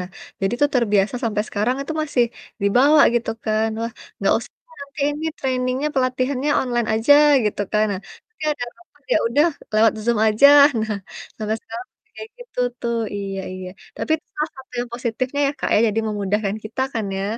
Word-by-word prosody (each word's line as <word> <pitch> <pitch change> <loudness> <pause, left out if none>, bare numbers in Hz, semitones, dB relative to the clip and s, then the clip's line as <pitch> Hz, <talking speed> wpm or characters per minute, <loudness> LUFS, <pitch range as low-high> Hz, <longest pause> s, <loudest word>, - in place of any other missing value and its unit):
Nah, 180 - -5 0.3
jadi 195 +2 0
tuh 290 - +4
terbiasa 210 -2 +2
sampe 215 -3 0
sekarang 220 +5 0
itu 315 - -5
masih 275 -5 +2 0.4
dibawa, 270 +9 +5
gitu 235 - 0
kan. 220 0 +1
Wah, 230 0 -3 0.3
nggak - - +2
usah - - -11 0.3
nanti 280 +1 -9
ini 300 +2 -5
training-nya, 255 +2 -1
pelatihannya 255 +2 0
online 240 -3 -1
aja, 225 +6 +5 0.3
gitu 210 -1 -1
kan. 215 0 +3
Nah, 185 - -4 0.3
nanti 445 -7 -17
ada 290 -5 -4
rapat, 320 -4 -25
ya - - +5
udah 290 +7 +3 0.3
lewat 220 0 +5
Zoom 235 -2 +2
aja, 220 +6 +6 0.3
nah 220 -1 -2 0.4
sampai 215 0 -2
sekarang 235 +2 -8
masih 435 - -45
kayak 440 - -8
gitu, 485 - -14 0.2
tuh, 235 -1 -1 0.2
iya 195 -1 -4
iya, 185 0 -7 0.3
tapi - - -5
itu 315 - -24
salah 300 +2 -1
satu 265 0 -14
yang 245 -1 -5
positifnya 250 +3 -2
ya, 275 - 0
Kak, - - -2
ya, - - +5
jadi 215 +1 0
memudahkan 205 0 -1
kita 220 +4 -5
kan 220 -3 -1
ya? 195 - -2
235 Hz, 185 wpm, -21 LUFS, 215-275 Hz, 0.4 s, aja